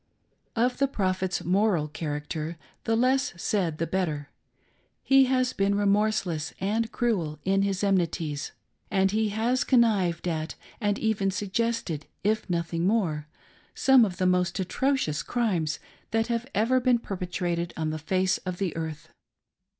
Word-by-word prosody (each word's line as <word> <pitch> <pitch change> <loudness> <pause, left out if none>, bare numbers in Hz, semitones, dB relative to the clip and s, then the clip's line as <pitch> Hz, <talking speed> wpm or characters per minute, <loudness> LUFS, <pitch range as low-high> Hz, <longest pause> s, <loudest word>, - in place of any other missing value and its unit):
Of 245 +2 +1
the 275 - +4
Prophet's 185 -6 -1
moral 185 -4 +2
character, 150 +1 -4 0.3
the 225 - +2
less 255 -1 +2
said 175 -5 0
the 165 - 0
better. 160 -5 -2 0.7
He 270 0 +6
has 255 -1 +1
been 200 0 +1
remorseless 200 -6 +1
and 220 +4 0
cruel 180 -11 0
in 195 +1 +3
his 195 0 0
enmities, 165 -6 0 0.4
and 190 -1 +2
he 215 +1 +1
has 230 +5 +1
connived 200 -9 +2
at 160 -1 -2 0.2
and 205 -3 +1
even 215 -3 +1
suggested, 205 -5 -2 0.2
if 215 0 0
nothing 170 0 0
more, 165 -9 0 0.5
some 265 -2 +6
of 190 -5 -1
the 185 - 0
most 180 0 +2
atrocious 190 - 0
crimes 185 -11 0 0.3
that 225 0 +1
have 235 +1 -1
ever 235 +5 +3
been 250 -1 +3
perpetrated 180 -4 -3
on 160 -1 -1
the 155 - -4
face 185 +4 +1
of 180 -1 -5
the 190 -3 -2
earth. 160 -2 -5
195 Hz, 140 wpm, -27 LUFS, 170-225 Hz, 0.7 s, He